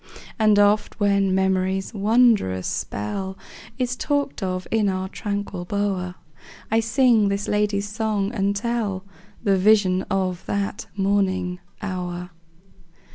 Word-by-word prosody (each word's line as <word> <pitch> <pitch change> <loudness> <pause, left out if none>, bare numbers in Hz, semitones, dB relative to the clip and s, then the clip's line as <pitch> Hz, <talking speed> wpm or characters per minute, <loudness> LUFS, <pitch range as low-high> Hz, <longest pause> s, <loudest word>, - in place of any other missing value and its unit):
And 215 -1 +5
oft 205 +1 +3
when 200 -2 +2
memory's 190 +1 0
wondrous 210 - +3
spell 190 - -3 0.4
Is 250 0 -1
talked 285 -2 -1
of 185 -1 -2
in 215 -3 +2
our 190 0 -2
tranquil 200 -3 -4
bower, 190 -2 -2 0.6
I 225 - +4
sing 230 -2 +3
this 200 +1 -2
lady's 210 -1 0
song, 210 -2 -1
and 200 -2 0
tell 210 -4 -2 0.4
The 200 -3 +3
vision 190 -2 +4
of 185 -2 -1
that 200 0 -2
morning 190 -2 +1 0.2
hour. 180 -2 -4
200 Hz, 120 wpm, -23 LUFS, 185-215 Hz, 0.6 s, And